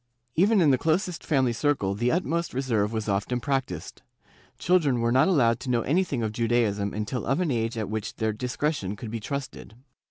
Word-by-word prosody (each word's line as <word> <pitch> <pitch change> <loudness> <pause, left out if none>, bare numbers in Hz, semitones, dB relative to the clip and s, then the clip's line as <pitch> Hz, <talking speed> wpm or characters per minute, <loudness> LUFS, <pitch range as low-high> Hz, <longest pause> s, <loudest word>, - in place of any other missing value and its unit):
Even 200 - +4
in 150 -4 +5
the 130 - +2
closest 170 +3 0
family 130 -6 +2
circle 115 -6 0
the 120 +5 0
ut 180 +2 +1
most 170 -4 -2
reserve 115 -6 0
was 110 -1 -3
often 105 +5 0
practised. 135 - -3 0.6
Children 160 -8 +2
were 115 0 +1
not 130 +6 +4
allowed 120 -10 +3
to 130 - -6
know 120 -2 +2
anything 145 -5 0
of 110 - -1
Judaism 110 -3 0
until 105 +4 -3
of 135 +4 0
an 175 -5 0
age 115 -1 -1
at 110 -3 -2
which 110 0 -4
their 110 -1 -1
discre 125 +7 -1
tion 100 -8 -4
could 110 +1 -7
be 115 - -3
trusted. 130 -2 -6
125 Hz, 200 wpm, -26 LUFS, 110-145 Hz, 0.6 s, in